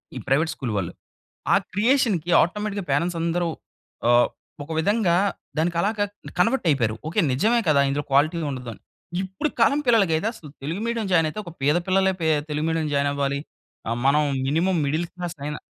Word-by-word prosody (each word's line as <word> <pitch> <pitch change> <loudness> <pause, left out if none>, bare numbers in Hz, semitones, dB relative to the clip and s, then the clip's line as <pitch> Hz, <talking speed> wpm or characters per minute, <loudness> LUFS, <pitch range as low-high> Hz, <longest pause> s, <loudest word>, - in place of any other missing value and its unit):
ఈ - - -4
private 155 +5 +2
school 125 -5 -4
వాళ్ళు. 95 -4 -3 0.6
ఆ - - +7 0.2
క్రియేషన్‌కి 210 - +2
ఆటోమేటిక్‌గా 205 +2 -2
పేరంట్స్ 170 +5 +1
అందరూ 170 +1 0 0.6
ఆహ్, 120 0 +5 0.4
ఒక 155 - -16
విధంగా 200 +1 +2 0.4
దానికి 170 +2 0
అలాగా 205 +2 +1 0.3
కన్వర్ట్ 225 +3 +2
అయిపోయారు. 120 -7 +1
ఓకె 165 - +1
నిజమే 220 - +2
కదా! 140 -2 +5
ఇందులో 145 +2 -1
క్వాలిటీ 145 +5 +3
ఉండదు. 125 -3 -6 0.5
ఇప్పుడు 190 - -2
కాలం 285 - +4
పిల్లలకైతే 200 -7 +3
అసలు 155 - -12
తెలుగు 165 +7 -3
మీడియం 230 -3 -1
జాయిన్ 165 -2 +4
అయితే 155 - -9
ఒక 175 - -8
పేద 150 +4 +3
పిల్లలే 190 0 +3 0.4
తెలుగు 150 +1 -1
మీడియం 160 -1 0
జాయిన్ 140 0 +2
అవ్వాలి. 140 0 -1 0.7
మనం 150 +2 +4 0.2
మినిమమ్ 170 +6 +1
మిడిల్ 155 +5 0
క్లాస్ 175 -1 -5
అయినా 150 +1 -4
165 Hz, 160 wpm, -24 LUFS, 145-195 Hz, 0.7 s, ఆ